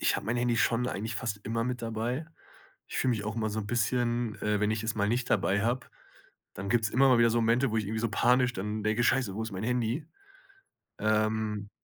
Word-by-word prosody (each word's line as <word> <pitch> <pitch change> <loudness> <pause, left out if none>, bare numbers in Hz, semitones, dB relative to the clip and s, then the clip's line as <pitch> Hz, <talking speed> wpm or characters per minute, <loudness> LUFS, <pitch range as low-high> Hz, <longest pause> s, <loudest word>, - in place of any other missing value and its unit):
ich - - +2
habe - - -6
mein 120 +2 0
Handy 120 -1 +1
schon 120 +2 +2
eigentlich 110 -1 -3
fast 115 -3 -3
immer 115 +1 -1
mit 125 0 -3
dabei. 115 +6 -3 0.6
Ich - - -4
fühle 130 - +2
mich 105 -2 -3
auch 105 +1 -4
immer 110 -1 0
so 110 - -3
'n 100 - -6
bisschen, 120 0 0
äh 105 -1 +1
wenn 105 0 +2
ich 110 0 -1
es 110 - -1
mal 100 -1 0
nicht 120 +2 -1
dabei 100 -1 +2
habe, 120 +3 -1 0.7
dann 100 +1 -5
gibt's 110 -2 +2
immer 135 +2 +4
mal 125 - +6
wieder 115 -1 +5
so 120 - +2
Momente, 120 +3 +2
wo 110 - -1
ich 105 - -1
irgendwie 110 +2 -2
so 115 -1 -1
panisch 125 +2 +3
dann 105 +2 -3
denke: 110 +2 +1
„Scheiße, 120 -7 +2
wo 110 - -4
ist 110 - -4
mein 95 +2 -5
Handy?“ 125 +5 -1 0.9
Ähm, 110 -1 0
115 Hz, 235 wpm, -29 LUFS, 105-120 Hz, 0.9 s, mal